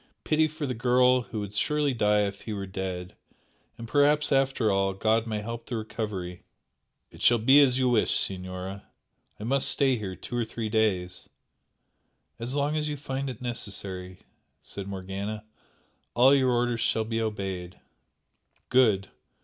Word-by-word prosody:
pity 155 0 +3
for 155 0 -5
the 130 - -2
girl 125 +2 +3
who 115 -2 -6
would 105 -1 -5
surely 150 +5 +1
die 105 -3 +3
if 100 -1 -3
he 110 - -5
were 100 -1 -4
dead! 95 -1 -5 0.6
and 115 - -8
perhaps 145 +3 +3
after 135 -5 +2
all, 95 0 +1
God 110 +3 +1
may 105 -1 -3
help 115 +1 -6
the 120 - -3
recovery!" 105 -5 -5 0.7
"It - - -14
shall 120 - +5
be 130 +6 +6
as 130 -3 +4
you 130 -1 +2
wish, 115 -3 +2
Signora! 95 +1 -4 0.5
I - - -7
must 135 +4 +2
stay 135 -3 +3
here 95 -3 -5
two 120 - -7
or 120 - +1
three 110 0 -4
days 95 -5 0 0.5
" - - -47
"As 120 +4 -3
long 145 +1 0
as 150 -1 -1
you 145 - -3
find 135 -1 -4
it 125 -1 -8
necessary" 95 -6 -4 0.4
said 100 -1 -6
Morgana 100 +2 -5 0.7
"All 130 +3 +6
your 130 -2 +3
orders 120 -1 +1
shall 110 - +1
be 115 0 -2
obeyed." 95 -5 -4 0.9
"Good! 110 -7 +3
110 Hz, 165 wpm, -27 LUFS, 100-130 Hz, 0.9 s, be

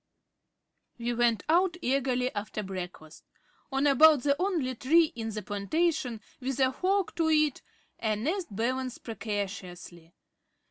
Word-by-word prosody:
We 240 0 -2
went 235 -2 +2
out 350 +2 +3
eagerly 255 -3 0
after 210 +1 -4
breakfast. 180 -5 -8 0.5
On 270 +1 +1
about 290 -1 +6
the 280 -1 +3
only 335 -10 0
tree 320 +7 +3
in 225 -1 -4
the 215 -1 -5
plantation 245 - -1 0.2
with 265 0 -3
a 260 -1 +4
fork 380 +5 0
to 325 -1 +2
it 305 -3 +2 0.4
a 220 -2 0
nest 330 - -2
balanced 250 +4 -2
precariously. 190 -6 -6
255 Hz, 130 wpm, -29 LUFS, 215-310 Hz, 0.5 s, about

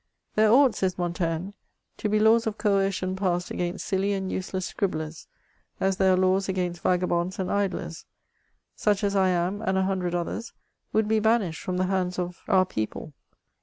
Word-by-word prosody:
"There 215 0 +4
ought," 260 0 +6
says 185 -1 -1
Montaigne, 175 +1 -2 0.5
"to 210 - -2
be 215 - +2
laws 225 +1 +4
of 220 0 -2
coercion 195 -3 +1
passed 180 -2 -1
against 175 +2 -3
silly 195 0 0
and 190 -1 -3
useless 185 0 -3
scribhlerSy 160 -5 -3 0.5
as 190 0 +1
there 190 -1 +4
are - - +3
laws 185 +1 +2
against 180 -2 -2
vagabonds 180 0 0
and 185 -1 -2
idlers. 200 -1 -2 0.7
Such 210 -1 +1
as 200 0 +1
I 190 -1 +4
am, 180 +3 0
and 190 -3 0
a 190 - +2
hundred 185 -2 -1
others, 175 +7 -3 0.4
would 220 -1 +2
be 220 0 +3
banished 215 -6 +1
from 180 -1 -3
the 185 - +1
hands 185 -1 -1
of 180 -1 -4
our 190 -3 +4
people. 110 +1 -4
190 Hz, 175 wpm, -26 LUFS, 180-200 Hz, 0.7 s, ought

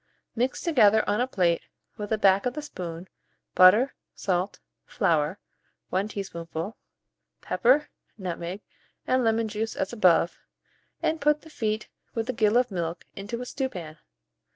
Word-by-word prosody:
Mix 250 +3 0
together, 220 -10 +4
on 210 +3 +1
a 250 - +1
plate, 175 -8 +1 0.3
with 210 -1 -5
the 220 - +1
back 200 +2 +4
of 250 - -4
a 300 - -3
spoon, 175 - -7 0.5
butter, 210 +9 +6 0.2
salt, 185 0 -1 0.3
flour 165 -5 +1 0.5
(1 190 +3 +1
teaspoonful), 180 -2 -5 0.7
pepper, 260 +10 +3 0.3
nutmeg, 180 0 -5 0.4
and 255 0 +2
lemon 225 0 +2
juice 220 +1 -3
as 190 - -2
above, 180 -6 +3 0.6
and 315 -1 0
put 300 +1 +3
the 320 - -14
feet, 215 -5 -2 0.3
with 225 0 -1
a - - -10
gill 220 -1 +3
of 250 -2 +2
milk, 170 -2 -3
into 220 +5 -5
a - - -4
stewpan. 180 - -5
210 Hz, 145 wpm, -27 LUFS, 180-245 Hz, 0.7 s, butter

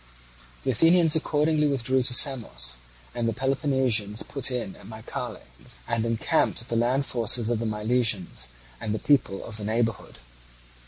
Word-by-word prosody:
The - - +1
Athenians 165 -1 +4
accordingly 150 0 +2
withdrew 130 -1 +1
to 125 0 +1
Samos, 65 - +2 0.4
and 115 -1 -1
the - - -2
Peloponnesians 130 -5 0
put 140 -3 -1
in 120 -7 -4
at - - -14
Mycale, 110 0 -7 0.4
and 115 -1 -1
encamped 115 -1 +1
with 115 +3 -5
the 115 - -1
land 125 +4 +1
forces 120 -1 0
of 115 - 0
the 115 - -2
Milesians 105 - 0 0.3
and 105 0 -2
the 110 - -8
people 130 -9 +2
of 110 - -6
the 105 - -5
neighbourhood. 115 +1 -2
120 Hz, 155 wpm, -26 LUFS, 110-135 Hz, 0.4 s, Athenians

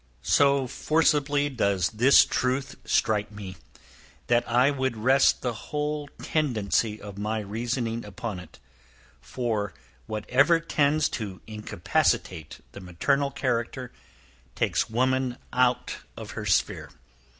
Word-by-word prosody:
So 140 - +3
forcibly 145 0 +1
does 100 -9 0
this 120 +5 +6
truth 130 +1 -1
strike 105 -2 +1
me, 100 -3 -8 0.7
that 120 0 +3
I 125 +4 +4
would 130 -4 -2
rest 130 +5 +3
the 125 -2 -1
whole 150 +5 -3 0.2
tendency 110 -7 0
of 100 -1 -9
my 110 +2 -1
reasoning 115 +2 -3
upon 105 -1 -6
it; 90 - -13 0.6
for 105 - -3 0.3
whatever 130 +10 +3
tends 155 -2 +2
to 100 -5 -5
incapacitate 85 -6 -1
the 100 - -10
maternal 140 +11 0
character, 125 -2 -2 0.6
takes - - 0
woman 130 +1 0 0.2
out 125 -1 +1 0.2
of - - -7
her - - -5
sphere. - - +1
120 Hz, 115 wpm, -26 LUFS, 105-140 Hz, 0.7 s, this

